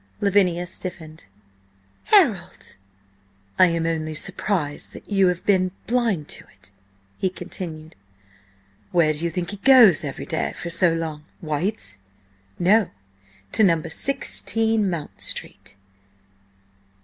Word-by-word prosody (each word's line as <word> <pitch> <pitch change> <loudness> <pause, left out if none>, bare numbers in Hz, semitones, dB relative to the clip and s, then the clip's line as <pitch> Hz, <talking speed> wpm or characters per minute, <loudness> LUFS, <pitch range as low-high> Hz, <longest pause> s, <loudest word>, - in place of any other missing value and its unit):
Lavinia 185 -3 +2
stiffened. 170 - -7 0.8
"Harold!" 275 - +2 0.8
"I 185 - +8
am 165 -1 -1
only 155 -1 -2
surprised 175 -4 -2
that - - -12
you 195 -2 +3
have 180 -1 -2
been 185 -2 +2
blind 225 -11 0
to - - -5 0.2
it," 95 0 -12 0.5
he 190 - 0
continued. 170 -3 -8 1.0
"Where 165 -4 +3
do 150 - -3
you 170 - +1
think 175 +1 -3
he 205 - -6
goes 225 - +6
every 140 -3 -5
day 160 -3 -2
for 170 - -6
so 170 +1 +3
long? 160 -2 -4
White's? 155 - -2 0.6
No. 200 +3 +3 0.6
To 165 -6 +2
16 225 -2 0
Mount 165 -4 -6
Street! 100 - -3
175 Hz, 115 wpm, -23 LUFS, 160-200 Hz, 1.0 s, I